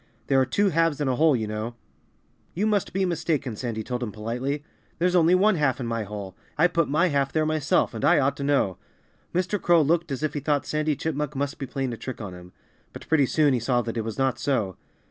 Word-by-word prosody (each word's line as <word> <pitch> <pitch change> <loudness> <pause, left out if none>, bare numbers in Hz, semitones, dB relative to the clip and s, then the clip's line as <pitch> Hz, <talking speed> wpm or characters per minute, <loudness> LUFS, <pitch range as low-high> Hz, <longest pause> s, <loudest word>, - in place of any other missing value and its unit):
There 135 -1 +3
are 130 - +1
two 200 +10 +2
halves 165 -3 +1
in 145 - 0
a 130 - +1
whole, 155 +1 +4
you 110 -3 -1
know." 110 +2 -4 0.8
"You 195 +5 0
must 210 -3 +1
be 190 +1 0
mistaken," 155 -8 -1
Sandy 110 -1 -4
told 125 +2 -4
him 115 -3 -3
politely. 125 +7 -3 0.3
"There's 180 +1 +1
only 175 +1 +5
one 200 +1 +4
half 135 -4 +1
in 125 - -3
my 115 -2 -2
hole. 100 -2 -7 0.2
I 160 - +5
put 170 -2 +1
my 165 +5 +3
half 140 -2 +1
there 155 -1 +1
myself, 155 -4 +1
and 110 - -5
I - - +5
ought 140 0 +2
to 140 - -4
know." 140 -10 +1 0.5
Mr. 185 +3 -1
Crow 170 -2 +5
looked 165 +1 +1
as 135 +2 -3
if 155 - 0
he 145 - -2
thought 145 0 0
Sandy 155 0 0
Chipmunk 150 0 -3
must 140 +1 -2
be 135 - -4
playing 135 -1 -3
a - - -6
trick 125 +3 -6
on 100 -5 -6
him. 90 0 -12 0.4
But - - -10
pretty 145 -4 +3
soon 150 -1 +3
he 125 - +1
saw 120 +1 +1
that 115 +1 -4
it 115 - 0
was 110 0 -5
not 135 -1 0
so. 110 -10 0
140 Hz, 240 wpm, -25 LUFS, 120-160 Hz, 0.8 s, only